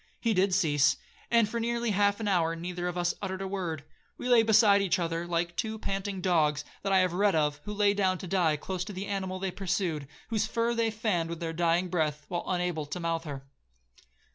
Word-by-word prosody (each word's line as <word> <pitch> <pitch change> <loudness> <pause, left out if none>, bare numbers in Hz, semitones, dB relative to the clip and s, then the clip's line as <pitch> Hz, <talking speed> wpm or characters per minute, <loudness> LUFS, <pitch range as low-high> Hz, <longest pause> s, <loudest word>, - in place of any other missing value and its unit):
He 230 -2 +1
did 190 -1 +2
cease, 145 -6 +3 0.3
and 230 -2 +4
for 235 +3 -3
nearly 235 0 0
half 205 +1 +2
an 220 - -2
hour 165 -4 +2
neither 175 +1 -4
of 180 0 -3
us 175 0 +1
uttered 190 -1 -3
a - - -3
word. 175 -6 -3 0.3
We - - -5
lay 240 -2 +7
beside 215 -2 +5
each 195 -4 +2
other 170 -1 -2
like 170 0 -1
two 220 +1 -2
panting 195 -2 -3
dogs 150 -5 +2 0.2
that 195 - -2
I 190 - +5
have 185 -2 +1
read 200 0 +2
of, 150 -1 +1
who 210 - -4
lay 205 0 +3
down 190 -2 +1
to 185 - -8
die 165 -4 +2
close 180 +4 -4
to 210 - -7
the 190 +1 -4
animal 190 -2 -3
they 190 0 -2
pursued, 175 -6 -2 0.2
whose 220 -1 0
fur 230 +1 0
they 230 -1 +1
fanned 210 -7 -1
with 170 -1 -5
their 165 -1 -3
dying 170 +2 +1
breath, 155 -4 -1
while 175 -1 -3
unable 175 -4 -1
to 150 +5 -5
mouthe 165 -1 -2
her. 140 -3 -6
185 Hz, 220 wpm, -29 LUFS, 165-205 Hz, 0.3 s, lay